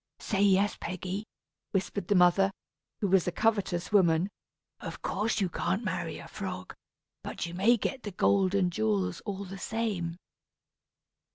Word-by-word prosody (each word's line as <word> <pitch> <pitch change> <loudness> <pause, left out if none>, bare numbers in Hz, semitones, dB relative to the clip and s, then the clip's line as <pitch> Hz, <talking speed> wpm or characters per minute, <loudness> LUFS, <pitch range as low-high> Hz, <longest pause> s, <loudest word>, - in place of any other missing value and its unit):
"Say 195 -3 -1
yes, 200 0 +4
Peggy," 185 +4 -4 0.5
whispered 195 +1 -1
the 205 - +3
mother, 180 +2 +5 0.5
who 205 - +2
was 190 -2 +3
a - - +2
covetous 200 -4 0
woman. 180 -2 +4 0.5
"Of - - -7
course 215 +4 0
you 195 - +2
can't 190 +5 -1
marry - - -2
a - - -9
frog, - - -6 0.5
but - - -4
you 170 - -6
may 210 +7 +4
get 265 +4 -3
the 210 - -5
gold 195 0 +2
and 180 -3 +2
jewels 100 - 0
all 200 0 -3
the 195 +1 -8
same." 195 -7 -2
195 Hz, 155 wpm, -30 LUFS, 175-205 Hz, 0.5 s, mother